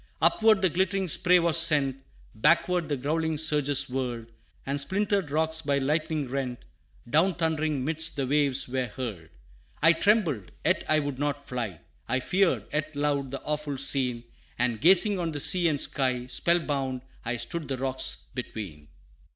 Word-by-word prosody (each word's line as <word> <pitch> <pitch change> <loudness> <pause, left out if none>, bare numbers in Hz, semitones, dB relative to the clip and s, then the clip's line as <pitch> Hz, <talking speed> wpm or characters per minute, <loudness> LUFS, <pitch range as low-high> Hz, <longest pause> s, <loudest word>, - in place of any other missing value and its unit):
Upward 215 -3 +4
the 185 - +4
glittering 190 +2 0
spray 180 +2 +4
was 170 -1 +3
sent, 150 -5 +3 0.4
Backward 170 +6 +2
the 145 - -1
growling 160 +4 -1
surges 145 -3 +2
whirled, 120 -3 -4 0.3
And 140 +1 -1
splintered 195 +3 0
rocks 160 +2 -1
by 140 -2 0
lightnings 150 0 -1
rent, 130 -3 -4 0.4
Down 160 +8 +2
thundering 155 -4 -1
midst 160 +1 0
the 140 -3 -1
waves 140 -1 +1
were 130 0 -2
hurled. 110 -12 -7 0.5
I 165 - +6
trembled, 165 - +1
yet - - +3
I 155 - +4
would 145 -3 -3
not 145 -1 -3
fly; 115 -10 -4 0.3
I 130 +2 +1
feared, 185 +7 +1
yet 155 0 -2
loved, 145 -2 -1
the 135 - -6
awful 150 -2 -3
scene; 130 -3 0 0.3
And 120 -2 0
gazing 190 +4 +6
on 165 -2 -2
the 145 - -3
sea 175 +4 +3
and 150 -3 0
sky, 125 -3 0
Spell 170 +7 +2
bound 135 -5 -3 0.2
I 120 +1 -2
stood 165 +4 -4
the 135 -1 -3
rocks 130 0 0 0.2
between. 100 - -7
145 Hz, 160 wpm, -27 LUFS, 130-165 Hz, 0.5 s, I